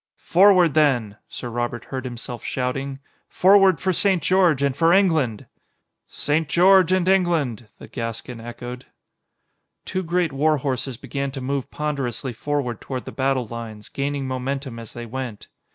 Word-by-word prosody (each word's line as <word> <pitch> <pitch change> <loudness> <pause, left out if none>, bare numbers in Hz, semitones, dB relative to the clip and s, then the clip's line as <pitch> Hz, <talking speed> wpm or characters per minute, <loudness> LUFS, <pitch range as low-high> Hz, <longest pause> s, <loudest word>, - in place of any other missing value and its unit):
"Forward 180 -3 +5
then!" 125 -9 +2
Sir 125 - -6
Robert 120 0 -3
heard 130 -1 -5
himself 120 -1 -6
shouting. 135 +2 -3 0.3
"Forward 195 -1 +5
for 185 0 0
St. 185 -2 +2
George 175 -5 +3
and 140 -2 +1
for 165 +3 +3
England!" 160 - +2 0.6
"St. 155 +1 -1
George 185 +1 +5
and 185 -1 +2
England!" 165 - +1
the - - -11
Gascon 115 0 -5
echoed. 120 +1 -8 1.0
Two 185 - -2
great 170 -3 0
war 150 +3 +2
horses 130 -2 -2
began 140 +2 -4
to 135 - -5
move 135 +1 -3
ponderously 135 -4 -3
forward 130 -2 -3
toward 130 -2 -5
the - - -7
battle 135 -2 0
lines, 110 -2 -8
gaining 140 -1 -3
momentum 130 -1 -4
as 115 -2 -10
they 120 0 -7
went. 120 -2 -6
135 Hz, 150 wpm, -23 LUFS, 120-165 Hz, 1.0 s, Forward